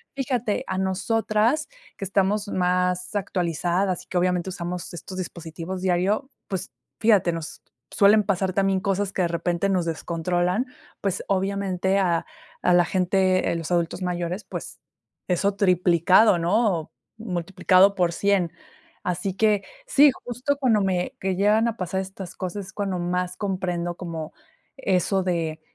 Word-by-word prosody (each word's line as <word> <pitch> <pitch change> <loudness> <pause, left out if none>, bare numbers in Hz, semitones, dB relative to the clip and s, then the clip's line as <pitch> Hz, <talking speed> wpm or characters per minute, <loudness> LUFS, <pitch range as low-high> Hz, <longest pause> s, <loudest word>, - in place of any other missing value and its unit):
fíjate 250 -6 -1
a - - -2
nosotras 215 +8 +1 0.3
que 195 - -5
estamos 200 +2 +1
más 180 0 0
actualizadas 180 -1 0
y - - -27
que 185 - -2
obviamente 180 0 +1
usamos 180 -1 -5
estos 185 +2 -8
dispositivos 170 +1 -6
diario, 190 +8 +1 0.2
pues 190 -1 -4 0.3
fíjate, 210 -6 +4
nos 165 -2 -6 0.3
suelen 210 +1 +5
pasar 190 -1 0
también 195 0 +2
cosas 195 0 -1
que 190 - -1
de - - +2
repente 170 +3 -1
nos 185 -3 +1
descontrolan, 175 +6 -1 0.4
pues, 195 -2 -1
obviamente 195 -1 0
a 170 -4 +1 0.4
a 180 - +4
la 175 0 +6
gente, 185 0 +2
eh, - - -1
los 165 -2 -4
adultos 170 +1 0
mayores, 180 +2 -2
pues, - - -7 0.5
eso 190 +3 +2
triplicado, 185 +1 +4
¿no?, 180 -2 +1 0.3
multiplicado 185 -1 +3
por 175 -3 +2
100, 195 -3 +1 0.5
así 180 +2 -2
que 210 -1 +2 0.2
sí, 295 - +6 0.2
justo 250 +4 -1
cuando 240 -7 +3
me, 185 -2 -1
que 190 -1 -1
llegan 210 +4 +3
a 230 -1 -3
pasar 190 +1 -2
estas 190 -1 -8
cosas 185 +2 -4
es 195 - -13
cuando 195 -3 -2
más 180 +1 -2
comprendo 180 -3 -2
como 165 -3 -6 0.4
eso 195 -5 +1
de 165 -3 -2
185 Hz, 145 wpm, -24 LUFS, 175-200 Hz, 0.5 s, la